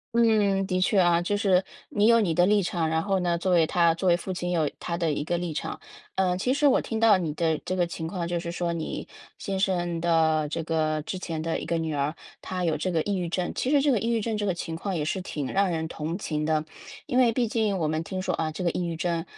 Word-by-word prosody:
嗯， 210 -4 +3
的 185 -1 -1
确 195 +2 +2
啊， 175 -1 +4
就 205 +4 0
是， 190 -2 +3 0.3
你 210 +1 +2
有 230 0 +6
你 190 -7 +1
的 175 +2 +4
立 205 -1 +3
场， 170 -2 -1
然 160 0 0
后 195 -1 +1
呢， 175 -1 +1
作 185 +2 -1
为 170 -3 +4
他 170 -1 +3
作 180 +3 0
为 175 - +5
父 185 +2 -5
亲 180 0 -3
有 165 -4 +1
他 170 -1 -3
的 165 -2 0
一 145 - -2
个 170 +3 -1
立 170 -2 -3
场。 - - -4 0.4
呃， 185 -2 +2
其 190 +8 0
实 290 +2 +1
我 270 - +4
听 225 - -3
到 225 -2 +6
你 165 -4 -2
的 160 -2 +1
这 185 - -2
个 180 -1 +2
情 165 -1 -5
况， 170 -1 -3
就 175 0 -1
是 170 0 -5
说 175 0 -2
你 165 -2 -4 0.3
先 195 -2 -3
生 175 -3 0
的 160 -3 +2
这 165 +2 -3
个 155 -1 0
之 185 - -5
前 165 -3 -4
的 165 +1 -2
一 - - -6
个 170 - 0
女 160 -1 -2
儿， 145 +2 -1 0.3
她 185 -1 -4
有 160 -2 +1
这 170 +5 -2
个 160 -3 +1
抑 200 -1 -1
郁 175 -2 -2
症， 175 +1 -1
其 255 - -1
实 290 0 +4
这 290 - +4
个 235 - +2
抑 230 - -1
郁 230 -1 +2
症 220 +1 -2
这 210 -1 -1
个 190 - +1
情 165 -1 -5
况 190 +3 -3
也 150 - -1
是 185 +4 -2
挺 150 -6 -4
让 195 0 +3
人 160 -2 -2
同 160 +2 -4
情 155 -6 -3
的。 155 0 +1 0.4
因 250 - +1
为 245 -2 +5
毕 240 +1 0
竟， 215 -3 0
我 160 -4 0
们 155 +1 -1
听 185 +2 -5
说 185 - -1
啊， 160 -1 -1
这 170 +4 -5
个 170 - +2
抑 180 - -2
郁 165 - -3
症， 170 -1 -1
175 Hz, 300 characters per minute, -26 LUFS, 165-195 Hz, 0.4 s, 有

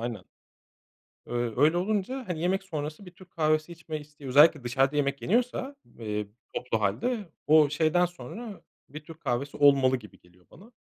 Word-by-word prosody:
aynen. 115 -5 -5 1.0
Ö 120 -2 -2
öyle 155 +4 +5
olunca, 215 +7 -1
hani, 170 -3 -3
yemek 190 +3 0
sonrası 155 0 -6
bir 180 - -11
Türk 185 0 -18
kahvesi 155 0 +1
içme 165 -2 -6
isteği 145 -1 -12
özellikle 145 +2 +6
dışarıda 135 +3 +1
yemek 140 -1 0
yeniyorsa, 250 +5 0 0.2
eee, 105 -2 -3 0.3
toplu 115 -3 -2
hâlde 180 - -1 0.2
o 155 -1 +6
şeyden 160 +4 +2
sonra 180 - -8 0.3
bir 150 +2 -9
Türk 160 +1 -13
kahvesi 135 0 -2
olmalı 135 -2 +5
gibi 105 -6 -15
geliyor 90 0 -25
bana. 215 +6 -16
150 Hz, 160 wpm, -28 LUFS, 130-180 Hz, 1.0 s, özellikle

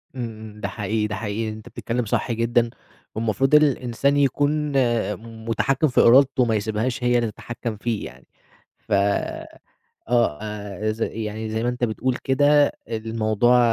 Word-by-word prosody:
إمم، 125 - -3 0.2
إمم. 105 0 -14
ده - - -1
حقيقي، 105 0 -2
ده 105 - -4
حقيقي. 110 +1 -3
أنت 110 0 -9
بتتكلم 120 0 -3
صح 110 - -1
جدًا، 115 +1 +1 0.5
والمفروض 115 +6 +2
الإنسان 140 -1 +2
يكون 145 +2 +1 0.7
مُتحكّم 135 +6 +1
في 125 - +3
إرادته، 130 +1 +5
ما 115 -2 +1
يسيبهاش 110 +4 -2
هي 120 0 +3
اللي 115 -3 0
تتحكم 115 -2 -6
فيه 115 -1 -2
يعني. - - -12 0.5
ف - - -10 1.2
آه 120 -11 +2
آآ 105 0 -4
ز 115 +1 -6
يعني 110 0 -3
زي 110 +1 -2
ما 120 - 0
أنت 125 0 -1
بتقول 125 +3 -1
كده، 145 +2 +4 0.2
الموضوع 115 +1 +1
115 Hz, 150 wpm, -23 LUFS, 110-130 Hz, 1.2 s, إرادته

